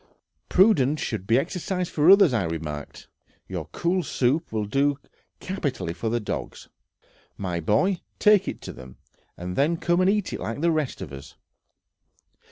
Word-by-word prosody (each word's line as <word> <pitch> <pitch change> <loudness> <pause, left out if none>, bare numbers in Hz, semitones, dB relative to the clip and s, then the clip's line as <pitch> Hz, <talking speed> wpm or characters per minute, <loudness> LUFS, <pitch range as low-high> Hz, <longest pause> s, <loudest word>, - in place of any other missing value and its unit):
"Prudence 155 - +4
should 100 -5 -4
be 115 - +4
exercised 180 +4 -2
for 155 +2 +3
others," 195 -7 +7
I 110 -6 +1
remarked; 75 -3 -6 0.4
"your - - -5
cool 180 +2 0
soup 145 +1 0
will 110 -1 -1
do 140 +6 +1 0.4
capitally 145 - -3
for 90 +6 -3
the 120 +1 0
dogs, 105 - -6 0.7
my 90 -3 -3
boy; 110 - +1 0.2
take 210 -2 +4
it - - -5
to - - -7
them, 65 0 -12 0.4
and 90 +1 -5
then 155 +5 +2
come 175 +2 +1
and 185 - +4
eat 205 -1 0
like 115 +6 -4
the 170 0 +3
rest 155 -4 -2
of 70 - -9
us...." 70 0 -10
140 Hz, 160 wpm, -25 LUFS, -, 0.7 s, others